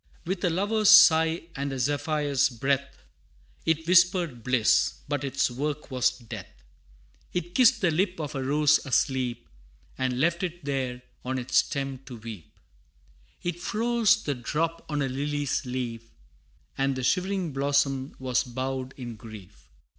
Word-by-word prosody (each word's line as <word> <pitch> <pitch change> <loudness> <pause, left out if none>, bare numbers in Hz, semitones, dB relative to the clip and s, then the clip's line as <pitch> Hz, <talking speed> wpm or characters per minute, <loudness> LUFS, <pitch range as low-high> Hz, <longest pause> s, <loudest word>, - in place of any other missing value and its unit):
With 185 +2 -3
a 180 - +3
lover's 205 +5 +2
sigh, 165 -6 +7
and 140 0 -3
a 135 - -4
zephyr's 145 +1 +1
breath, 135 +3 -2 0.6
It 160 0 +1
whispered 175 - +3
bliss, 125 -3 +3
but 145 -1 -2
its 135 -2 0
work 145 +3 -4
was 130 -1 +1
death: 115 -3 -9 0.8
It 175 0 -3
kissed 245 0 +5
the 180 -4 +3
lip 180 +2 0
of 150 -3 -4
a 135 - -3
rose 150 +2 +3
asleep, 125 -3 0 0.5
And 130 -1 -1
left 170 +4 +1
it 175 -4 -5
there 130 -3 -2 0.2
on 130 +1 -2
its 125 +1 -1
stem 135 -2 0
to 125 -3 -8
weep: 110 -7 -10 0.9
It 175 0 -3
froze 230 +3 +2
the 145 - -1
drop 160 +7 -2
on 150 -2 0
a - - 0
lily's 145 +1 -2
leaf, 120 -2 -4 0.7
And 135 0 0
the 130 - -4
shivering 185 +1 0
blossom 140 -1 0
was 130 -1 0
bowed 130 +1 -4
in 120 -3 -7
grief. 105 - -13
140 Hz, 145 wpm, -27 LUFS, 130-165 Hz, 0.9 s, sigh